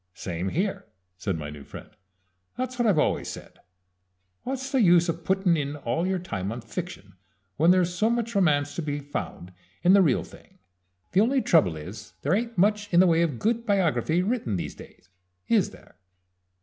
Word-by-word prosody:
"Same 90 +1 -4
here," 190 - -2 0.3
said 90 -1 -3
my 75 -1 -6
new 75 -1 -10
friend. - - -11 0.7
"That's 255 0 -4
what 240 - +3
I've 200 -6 +3
always 150 - +1
said. - - -9 0.8
What's 265 +1 -4
the 265 -3 +3
use 175 -3 +5
of 165 0 -3
puttin' 190 -1 +2
in 145 -2 -2
all 145 +5 -2
your 190 0 0
time 100 - -4
on 120 +2 -5
fiction 115 - -7 0.4
when 165 +3 +4
there's 180 -1 +3
so 215 +5 +1
much 235 0 -1
romance 145 -7 +2
to - - -1
be 145 -2 -3
found 140 -10 -6 0.3
in 180 +2 +6
the 200 - +7
real 150 -9 +2
thing? 190 - -17 0.5
The 185 - +4
only 260 +5 +3
trouble 95 - +3
is 100 +7 -9
that - - -40
there 145 - +1
ain't 230 +2 -1
much 205 +2 +2
in 175 - +5
the 185 - +7
way 165 -2 +3
of 155 -7 0
good 230 - 0
biography 180 -4 +1
written 205 - -1
these 90 - -4
days - - -15 0.4
is - - +3
there?" - - -18
175 Hz, 190 wpm, -26 LUFS, 130-205 Hz, 0.8 s, the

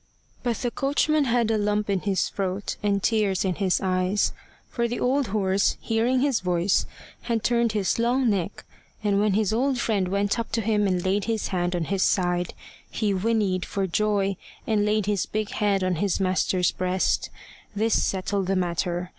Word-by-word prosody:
But 240 -2 -1
the 245 - -2
coachman 290 +3 +1
had 235 -2 +1
a 220 - +1
lump 210 0 0
in 200 -2 +1
his 195 0 0
throat 195 0 -3
and 200 -2 0
tears 205 -4 +1
in 185 - +1
his 190 -1 +1
eyes. 185 +2 +1 0.3
For 235 -1 -1
the 240 - -3
old 265 +1 +1
horse, 195 -1 +1
hearing 235 +3 +1
his 275 -4 +2
voice, 180 +1 +1 0.3
had 230 -2 -2
turned 235 -2 +2
his 205 +1 0
long 245 +2 +2
neck, 200 -3 -1 0.4
and 200 -1 +2
when 210 -1 +2
his 215 0 +1
old 260 +3 +1
friend 210 -6 0
went 200 +4 0
up 230 - -4
to 230 - +1
him 210 -1 +1
and 185 -2 -1
laid 195 +1 +1
his 225 -2 -1
hand 180 -1 -1
on 175 - -1
his 195 +3 -1
side, 175 -2 +1 0.3
he 210 -3 -1
whinnied 195 -2 0
for 195 -1 -2
joy, 200 0 0 0.3
and 210 -2 +1
laid 210 -1 +1
his 205 -2 0
big 215 -1 -3
head 200 -2 +1
on 185 -2 0
his 200 +2 0
master's 185 -1 +1
breast. 185 0 0 0.5
This 220 +2 +2
settled 195 0 -1
the 195 - +1
matter. 175 0 -1
205 Hz, 185 wpm, -25 LUFS, 185-225 Hz, 0.5 s, his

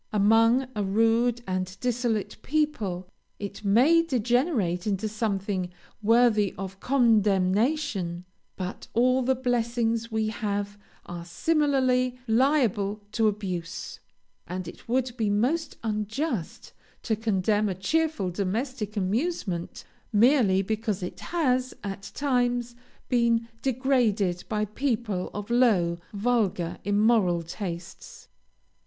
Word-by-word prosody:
Among 225 +5 +4
a 210 - 0
rude 225 +4 +2
and 185 0 -3
dissolute 240 -4 -1
people 235 -12 -1 0.3
it 200 +1 -7
may 255 +12 +5
degenerate 245 - 0
into 205 +1 0
something 200 -4 -2 0.3
worthy 220 -2 +3
of 195 0 -6
condemnation; 210 - +2 0.3
but 185 0 -6
all 255 +2 +4
the 260 +1 +2
blessings 235 -2 0
we 220 -1 0
have 205 -1 -3 0.3
are 175 -1 -7
similarly 255 - +1
liable 220 -5 +2
to 225 0 +2
abuse, 185 -5 -4 0.5
and 180 0 -5
it 225 - -11
would 250 0 0
be 220 -3 +1
most 255 +11 0
unjust 215 - -3 0.3
to 220 - 0
condemn 210 -1 +1
a 185 - -2
cheerful 260 - 0
domestic 210 +4 -3
amusement, 200 - -2 0.3
merely 215 -4 +4
because 215 -1 -2
it 180 - -6
has, 255 -7 0
at 200 0 -6
times, 245 -3 0 0.3
been 235 -2 +2
degraded 235 -8 +1
by 215 -1 0
people 215 -4 -2
of 205 +2 -6
low, 195 -9 +3
vulgar, 205 -6 0
immoral 205 -4 +3
tastes. 170 0 -7
220 Hz, 110 wpm, -26 LUFS, 195-245 Hz, 0.5 s, may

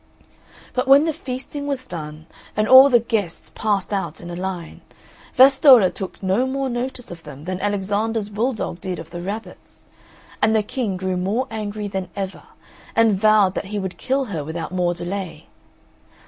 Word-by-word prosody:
But 255 +1 -1
when 275 +3 +7
the 320 - 0
feasting 285 0 -6
was 270 -2 -3
done, 155 -4 -8 0.3
and 215 0 +2
all 260 +3 +9
the 245 -3 +5
guests 220 -7 -3
passed 205 -2 -1
out 195 - -3
in 175 0 -8
a - - -5
line, 180 -2 -5 0.5
Vastolla 260 -6 +7
took 190 0 -8
no 195 +7 +1
more 270 0 -2
notice 245 -1 -4
of 170 -1 -9
them 150 -1 -11
than 185 +1 -4
Alexander's 205 +2 -1
bull 225 +6 -1
dog 175 -5 -5
did 185 -2 -4
of 165 - -10
the 175 - -6
rabbits; 205 +5 -8 0.6
and 220 +1 +3
the 215 - +3
King 210 -3 -3
grew 185 0 -2
more 205 +8 0
angry 210 -1 -4
than 190 -2 -4
ever, 195 -1 -5 0.5
and 220 -4 +3
vowed 215 -3 +5
that - - -4
he 205 +2 -5
would 190 -2 -5
kill 270 +1 0
her 170 - -4
without 160 +3 -5
more 175 -1 0
delay. 175 -2 -5
205 Hz, 175 wpm, -21 LUFS, 185-245 Hz, 0.6 s, all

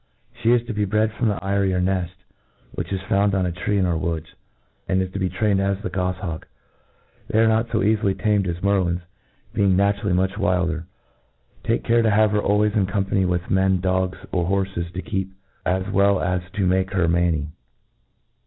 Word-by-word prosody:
She 115 0 +3
is 120 -1 +3
to 120 - -4
be 105 -1 0
bred 110 +2 +1
from 115 +2 0
the 105 - 0
eyrie 100 -1 +1
or - - +1
neft, 90 -1 -1 0.6
which - - -5
is 95 -1 -2
found 100 +1 +2
on 95 -1 +1
a 90 - -1
tree 95 +4 -1
in 95 - +2
our 85 -2 +1
woods; 80 -2 -3 0.5
and 95 0 +1
is 95 0 -2
to 100 - -4
be 95 -1 0
trained 100 +2 +1
as 100 0 0
the 110 - -3
gofliawk. 90 -2 -3 0.8
They - - -1
are 115 0 +5
not 110 +1 +2
fo 115 -2 0
calily 100 -2 +1
tamed 105 -2 +1
as 85 +1 -4
merlins, 95 -3 +1 0.5
being 100 -2 +3
naturally 100 0 +1
much 95 +1 0
wilder. 85 -2 0 0.8
Take 115 - 0
care 115 0 +3
to 115 - +3
have 105 0 +4
her 105 0 +1
always 105 +1 +2
in 100 -4 +2
com 100 0 -1
pany 95 -1 +1
with 90 -1 -2
men, 95 0 +3
dogs, 95 0 0
or 90 -2 0
horfes, 95 -3 -1
to 90 +1 -5
keep, 95 -3 -3 0.3
as 95 +1 0
well 100 -1 +4
as 90 0 0
to 100 -2 0
make 95 +1 +1
her 90 -3 +2
manny. 85 -3 +1
95 Hz, 200 wpm, -22 LUFS, 90-100 Hz, 0.8 s, are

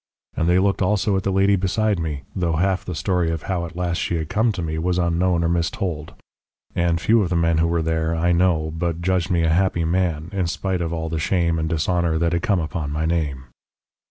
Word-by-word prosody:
And 80 - +1
they 90 - +4
looked 100 +1 +1
also 100 +1 +1
at 95 - +1
the 95 - -1
lady 100 +1 +3
beside 100 +1 0
me, 75 -4 -3
though 85 -3 0
half 95 +3 +1
the 90 - -5
story 90 -2 0
of 80 -1 -3
how 90 -3 -2
at 85 - -13
last 85 -1 -1
she 85 - -1
had 80 -2 -3
come 110 +2 +2
to 90 -3 -4
me 80 0 -3
was 90 +2 0
unknown 85 0 +1
or - - +2
mistold. 85 -1 -2 0.6
And 85 -1 +1
few 115 +5 +3
of 95 - -1
the 90 - 0
men 85 -1 +2
who 85 - +3
were 85 -1 0
there, 80 0 0
I 85 +2 +1
know, 85 -3 +2
but 85 0 -2
judged 90 -1 +1
me 85 -2 +2
a 80 - +2
happy 85 0 +1
man, 85 -2 0
in 95 -3 -1
spite 95 +1 -2
of 85 -1 -2
all 80 -1 -3
the 80 0 -2
shame 85 0 +1
and 80 0 -1
dishonour 85 0 0
that 85 +1 +1
had 85 - 0
come 100 -1 +1
upon 80 -2 -3
my 75 +2 -2
name. 75 -6 -1
85 Hz, 240 wpm, -22 LUFS, 80-95 Hz, 0.6 s, they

